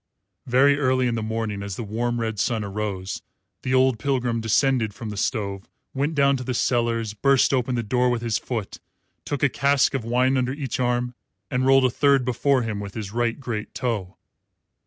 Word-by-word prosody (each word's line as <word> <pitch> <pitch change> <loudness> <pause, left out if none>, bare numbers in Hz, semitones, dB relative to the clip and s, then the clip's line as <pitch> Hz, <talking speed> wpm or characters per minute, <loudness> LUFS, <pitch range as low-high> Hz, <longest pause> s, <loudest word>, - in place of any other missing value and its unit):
Very 140 +3 +4
early 130 -2 +2
in 120 - +1
the 115 - -2
morning, 110 -2 -3
as 100 -2 -5
the 115 - -5
warm 120 +3 -2
red 110 -2 -2
sun 115 0 0
arose, 100 -2 -4 0.4
the 130 0 0
old 130 -3 +3
pilgrim 125 -2 0
descended 115 -1 +1
from 110 0 -6
the - - -6
stove, 100 -2 -2 0.3
went 145 +4 -1
down 140 -1 +4
to 130 - -5
the 125 0 -3
cellars, 115 -3 0
burst 135 +5 +3
open 125 -1 +1
the 120 - -1
door 125 +3 +1
with 120 -1 -1
his 115 -4 0
foot, 115 -6 -5 0.5
took 145 -1 -3
a - - +7
cask 140 +1 +2
of 135 -4 -1
wine 125 +3 +2
under 130 0 0
each 135 -5 -4
arm 125 0 0 0.4
and 130 0 +1
rolled 135 -1 +6
a 125 - +2
third 140 -1 +3
before 130 +1 +2
him 110 -2 -3
with 100 -1 -7
his 105 -3 -5
right 120 +2 -1
great 115 -5 -5
toe. 105 -7 -3
120 Hz, 200 wpm, -24 LUFS, 110-130 Hz, 0.5 s, a